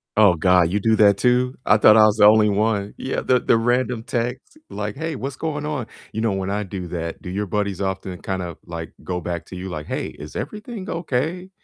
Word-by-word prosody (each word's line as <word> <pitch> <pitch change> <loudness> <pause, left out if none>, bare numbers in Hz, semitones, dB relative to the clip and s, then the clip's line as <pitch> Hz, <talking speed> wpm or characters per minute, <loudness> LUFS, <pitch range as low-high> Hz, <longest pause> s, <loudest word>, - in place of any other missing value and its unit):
Oh, 105 -4 +6
god, 90 0 +3
you 105 - +1
do 110 +2 +3
that 100 -2 +5
too? 125 +3 +2
I 105 - +5
thought 105 0 +7
I 110 - +8
was 110 0 +2
the 105 - +6
only 105 0 +6
one. 105 0 0
Yeah, 130 - -3
the 125 -1 +3
the - - +3
random 120 0 0
texts 125 - -4
like, - - -4
"Hey, 160 0 -3
what's 135 +1 -5
going 150 0 -3
on?" 150 -6 -3 0.3
You 110 - -3
know 115 -2 +1
when 95 0 -2
I 105 +1 -1
do 95 -2 -6
that, 85 -1 -5
do 90 - -7
your 100 +3 -2
buddies 100 -1 -2
often 95 -2 -3
kind 95 -1 -3
of 85 -3 -6
like 85 -1 -7
go 90 -1 -3
back 85 0 -4
to - - -9
you 95 +1 -6
like, 75 -4 -5
"Hey, - - -3
is 75 +1 -10
everything 210 - -6
okay?" 165 +3 -2
105 Hz, 230 wpm, -22 LUFS, 95-125 Hz, 0.3 s, I